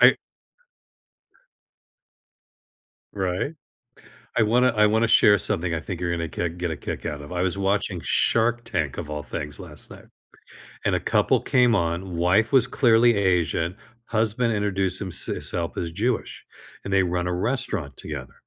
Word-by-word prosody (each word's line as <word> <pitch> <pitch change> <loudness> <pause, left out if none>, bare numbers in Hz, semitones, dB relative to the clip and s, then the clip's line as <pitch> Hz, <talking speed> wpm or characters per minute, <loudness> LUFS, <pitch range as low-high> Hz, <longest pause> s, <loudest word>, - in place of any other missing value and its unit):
I - - +7 3.0
Right. 95 - -2 0.8
I 115 - +4
wanna 125 +4 +3
I 105 -3 +3
wanna 110 +2 +2
share 105 -1 +6
something 85 -1 0
I 80 - -2
think 90 +1 -6
you're 85 -1 -1
gonna 85 -1 -2
kick 85 +1 -3
get 90 -2 -2
a 80 - -3
kick - - -6
out 75 -1 -4
of. 75 +5 -10
I 90 0 -1
was 95 +1 -1
watching 100 -2 0
Shark 120 +7 +2
Tank, 80 -6 -2
of 80 -3 -6
all 75 -1 -4
things, 75 -1 -6
last - - -10
night, - - -13 0.8
and - - +1
a - - +1
couple - - +2
came 125 -2 +3
on, 85 +1 -2
wife 95 +6 +2
was 130 -4 +6
clearly 120 -3 +4
Asian, 90 -2 0 0.3
husband 115 +1 0
introduced 95 -2 0
himse 95 -3 -2
his - - -2
self 85 -2 -3
as 85 -1 -3
Jewish, 115 +7 -2 0.4
and 100 - -6
they 95 -1 +4
run 90 0 -1
a 90 - -1
restaurant 100 - -2
together, 65 -4 -7
95 Hz, 160 wpm, -24 LUFS, 85-110 Hz, 3.0 s, I